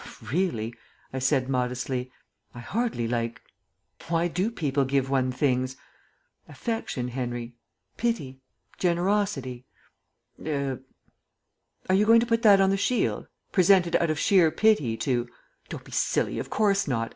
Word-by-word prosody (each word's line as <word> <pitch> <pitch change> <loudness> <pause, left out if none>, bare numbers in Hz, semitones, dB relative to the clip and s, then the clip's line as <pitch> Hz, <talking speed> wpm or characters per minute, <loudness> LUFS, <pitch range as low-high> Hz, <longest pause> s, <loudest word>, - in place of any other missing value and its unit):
"Really," 125 - -1 0.4
I 130 - -2
said 130 0 +1
modestly, 125 0 -2 0.4
"I - - -7
hardly 205 - -2
like 115 0 -2 0.7
Why 170 +1 +1
do 180 +5 -1
people 145 - 0
give 135 0 0
one 130 -1 +1
things? 130 -1 0 0.7
Affection, 225 - -3
Henry; 120 -1 -4 0.4
pity, 145 - -2 0.4
generosity 175 -9 0 0.8
er 140 -4 -2 0.5
" - - -36
"Are 185 - +2
you 210 +2 +3
going 230 +1 +7
to 235 - +1
put 230 -1 +1
that 205 -4 +7
on 195 0 +4
the 195 - +1
shield? 235 +5 0 0.2
'Presented 180 -2 +4
out 170 - 0
of 155 - 0
sheer 180 -1 +4
pity 155 - +2
to 120 +1 -1 0.2
'" - - -37
"Don't - - -7
be - - -15
silly; - - 0
of - - -5
course 200 -3 +2
not. 115 -4 -1
140 Hz, 145 wpm, -26 LUFS, 125-195 Hz, 0.8 s, going